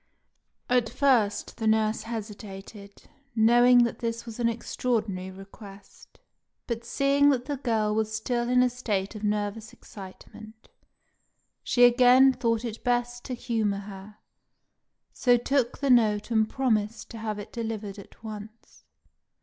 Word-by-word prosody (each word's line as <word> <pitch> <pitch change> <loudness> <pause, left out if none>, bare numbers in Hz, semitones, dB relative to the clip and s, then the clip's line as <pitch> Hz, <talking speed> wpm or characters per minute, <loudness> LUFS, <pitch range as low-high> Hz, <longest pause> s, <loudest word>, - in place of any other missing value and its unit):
At 245 -2 +2
first 240 -8 +1
the 225 - -2
nurse 220 0 +2
hesitated, 205 -2 -9 0.3
knowing 240 +2 +6
that 235 - -2
this 230 0 -4
was 230 0 -9
an 235 -1 +2
extraordinary 220 -5 -2
request; 195 +1 -14 0.5
but 235 -1 -4
seeing 280 +3 +2
that 255 -3 0
the 285 0 -3
girl 225 -5 0
was 220 0 -1
still 240 +2 -2
in 250 0 +4
a 250 - +2
state 210 -6 -3
of 215 -1 -9
nervous 210 +1 -2
excitement, 215 +3 -13 0.9
she 245 - +2
again 250 +2 +6
thought 235 -2 -1
it 225 -1 -6
best 245 0 -1
to 255 - -4
humour 225 -5 -1
her, 200 +1 -10 1.0
so 245 -1 +3
took 250 0 0
the 280 -2 0
note 215 -2 +3
and 220 -1 +2
promised 225 -4 -1
to 230 - -8
have 215 -1 -4
it 205 +1 -9
delivered 220 -4 -5
at 200 - -16
once. 215 +1 -10
225 Hz, 140 wpm, -26 LUFS, 210-245 Hz, 1.0 s, knowing